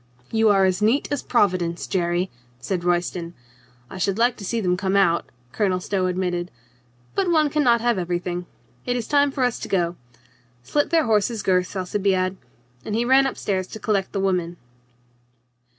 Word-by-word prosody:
"You 225 -1 +3
are 195 -2 +4
as 185 +1 0
neat 230 +7 +2
as 290 - -1
Providence, 180 -7 +1
Jerry" 175 -1 -1 0.3
said 175 +7 -3
Roy 175 0 +3
ston. 175 -1 -6 0.5
"I 185 - -9
should 195 +1 0
like 240 +1 +3
to - - -9
see 230 +4 -1
them 180 -4 +1
come 190 +1 -1
out," 175 -4 +2 0.2
Colonel 185 +3 0
Stow 185 0 -1
admitted. 180 -1 -2 0.6
"But 385 -2 0
one 310 -3 +3
can 300 0 +1
not 235 -3 +4
have 235 -4 +1
everything. 175 0 -3 0.4
It 245 - -1
is 235 -3 -3
time 285 -1 +3
for 270 -1 -2
us 245 -2 0
to - - -6
go. 175 -3 0 0.7
Slit 290 - 0
their 330 -1 +3
horses' 220 0 +1
girths, 185 +1 +1
Alci 185 +2 -2
biade," 190 -1 +1 0.5
and 210 - -3
he 235 +2 +1
ran 265 +2 +5
up 270 - -5
stairs 190 -2 -2
to 220 - -9
collect 200 -3 0
the 195 - -2
women. 180 -3 -1
195 Hz, 185 wpm, -23 LUFS, 180-235 Hz, 0.7 s, ran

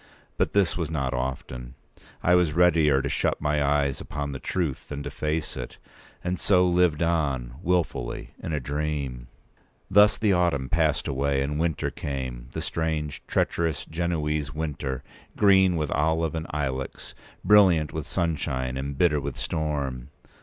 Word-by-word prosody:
But - - 0
this 100 -5 +3
was 85 -3 -2
not 70 -5 -1
often. 65 -1 -4 0.5
I 90 - +4
was 90 -4 +4
readier 80 -5 +4
to - - -1
shut - - 0
my 75 -1 +1
eyes 70 -1 +1
upon 70 -1 -4
the 65 - -5
truth 80 -5 -2
than 70 -1 -5
to - - -5
face 75 +1 -2
it; - - -7 0.5
and 90 0 -2
so 90 -2 +4
lived 90 -3 +3
on, 70 -8 0
wilfully, 85 -9 -1
in - - -4
a 75 - 0
dream. 70 -3 -3 0.6
Thus 105 +1 +6
the 105 -3 +2
autumn 85 -7 +1
passed 80 -2 +1
away, 70 0 0
and 75 +2 -2
winter 80 -2 0
p. - - -7
196came—the 65 -3 -4
strange, 80 -3 -2
treacherous, 80 -3 0
Genoese 75 -4 -2
winter, 75 -4 -3 0.3
green 95 -3 +5
with 75 -3 -1
olive 80 +1 +1
and 80 0 -4
ilex, 65 -3 -4 0.3
brilliant 90 -8 +5
with - - -4
sunshine, 65 -6 -1
and 70 +1 -4
bitter 75 -3 +3
with - - -5
storm. 70 -6 -2
75 Hz, 155 wpm, -26 LUFS, 70-85 Hz, 0.6 s, Thus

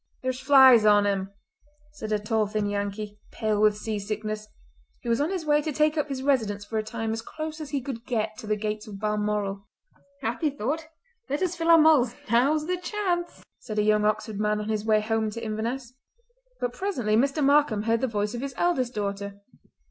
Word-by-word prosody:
"There's 255 0 -2
flies 265 -4 +7
on 205 -1 +5
him," 195 -1 0 0.6
said 220 -7 -7
a 210 - +3
tall 215 +1 0
thin 210 0 -1
Yankee, 205 +1 -3
pale 215 -1 0
with 210 -1 +4
sea 215 -1 -3
sickness, 215 +1 -4 0.6
who 240 - -4
was 230 +3 +2
on 300 - +1
his 370 -4 -3
way 295 0 +3
to 310 - -3
take 305 +2 +2
up 300 -1 -1
his 265 -1 -4
residence 220 -7 +1
for 220 +1 -2
a - - -2
time 225 0 -3
as 225 - -3
close 310 +5 -6
as 300 - -6
he 275 -1 -1
could 245 -4 -5
get 220 -3 -1
to 220 - -8
the 215 - +1
gates 210 0 -4
of 200 -2 -8
Balmoral. 210 -2 -1 0.6
"Happy 260 +7 0
thought! 290 +4 -3 0.4
Let 290 +6 -1
us 360 -1 -1
fill 335 -1 -1
our 335 - +9
mulls; 305 -7 +5 0.2
now's 285 +6 +3
the 360 +2 -1
chance!" 355 -2 -2 0.2
said 215 - -7
a 210 - +3
young 210 0 +3
Oxford 215 0 -1
man 210 0 +1
on 210 +1 -4
his 215 -1 -1
way 215 -1 +3
home 220 0 0
to 230 +2 -7
Inverness. 235 +4 -3 0.7
But 245 0 -2
presently 250 - -1
Mr. 275 +5 +2
Markam 280 -7 +3
heard 225 +1 +1
the 260 - +1
voice 210 -1 -2
of 240 - -4
his 275 -2 -5
eldest 260 -9 0
daughter. 200 -1 -4
225 Hz, 210 wpm, -26 LUFS, 210-280 Hz, 0.7 s, our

